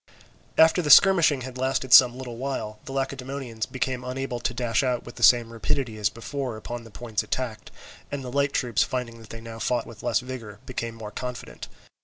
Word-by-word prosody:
After 160 +2 +6
this 150 -4 +9
skirmishing 170 -8 +4
had 130 0 -7
lasted 130 -1 0
some 125 0 +8
little 125 -3 -7
while, 120 -5 -4
the - - -7
Lacedaemonians 135 -3 -4
became 130 -1 -3
unable 125 -1 -4
to 120 - -1
dash 120 -2 0
out 125 -3 -1
with 120 - -9
the - - -12
same 120 -2 +5
rapidity 115 0 -2
as 105 -1 +2
before 125 +1 -5
upon 120 +2 -7
the - - -12
points 110 0 -3
attacked, 115 -4 -4 0.4
and 140 -1 -4
the 125 - -6
light 140 +1 +1
troops 120 -5 0
finding 120 -2 -2
that 110 - -14
they 115 - -8
now 115 0 -9
fought 120 +1 0
with 115 - -12
less - - +1
vigour, 125 -5 -8
became 115 -2 -4
more 110 -2 -8
confident. 125 +2 -7
125 Hz, 200 wpm, -25 LUFS, 115-135 Hz, 0.4 s, this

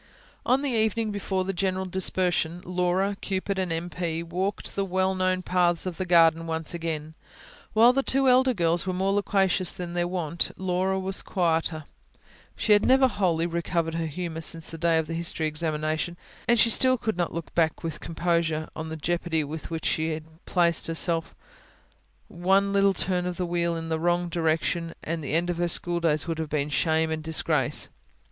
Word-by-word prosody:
On 260 +3 +3
the 280 - 0
evening 220 -1 +1
before 190 -2 -2
the 195 - -2
general 190 0 -1
dispersion, 180 -2 0
Laura, 180 +2 0
Cupid, 195 0 -2
and 185 -2 -1
M. 165 +1 -2
P. 170 -1 -3
walked 185 +4 -3
the 200 - 0
well 190 0 0
known 185 0 0
paths 175 -1 +1
of 180 -3 -4
the 185 - -3
garden 165 -1 +4
once 160 0 -3
again. 160 -2 -4 0.6
While 230 +3 +6
the 275 - +2
two 270 0 +1
elder 255 0 +4
girls 170 0 +1
were 185 - 0
more 190 +2 +1
loquacious 195 -2 +1
than 175 -1 -6
their 175 0 0
wont, 170 -2 -1
Laura 190 +1 0
was 190 +1 -3
quieter. 165 -3 0 0.7
She 215 - +3
had 205 - +4
never 265 +1 +5
wholly 175 -8 0
recovered 170 -1 -1
her 165 0 -2
humour 165 +1 -5
since 165 0 -1
the 165 - -8
day 165 0 +3
of 160 - +1
the 165 - -6
history 165 -1 -1
examination; 155 +2 -2 0.3
and 235 - +4
she 230 +1 +5
still 255 +3 +4
could 220 -3 -2
not 175 -1 -1
look 165 -1 -6
back, 165 0 +1
with 160 -2 -4
composure, 165 -2 -1
on 160 0 -5
the 160 - -5
jeopardy 170 0 0
in 145 - -5
which 160 +1 -5
she 160 0 0
had 155 0 -5 0.2
placed 170 -2 +2
herself 165 0 +1 0.9
one 195 +3 +1
little 200 -1 +3
turn 180 0 -1
of 180 -1 -4
the 180 - -1
wheel 170 -1 0
in 165 0 -5
the 160 0 -1
wrong 175 +1 +1
direction, 165 0 -1
and 165 0 -3
the 145 - -4
end 175 +2 +1
of 175 - -4
her 175 - +1
schooldays 170 -3 +1
would 165 -1 -2
have 160 -2 -3
been 145 -1 -1
shame 160 +2 +1
and 160 0 -2
disgrace. 155 -4 +1
175 Hz, 190 wpm, -26 LUFS, 160-190 Hz, 0.9 s, While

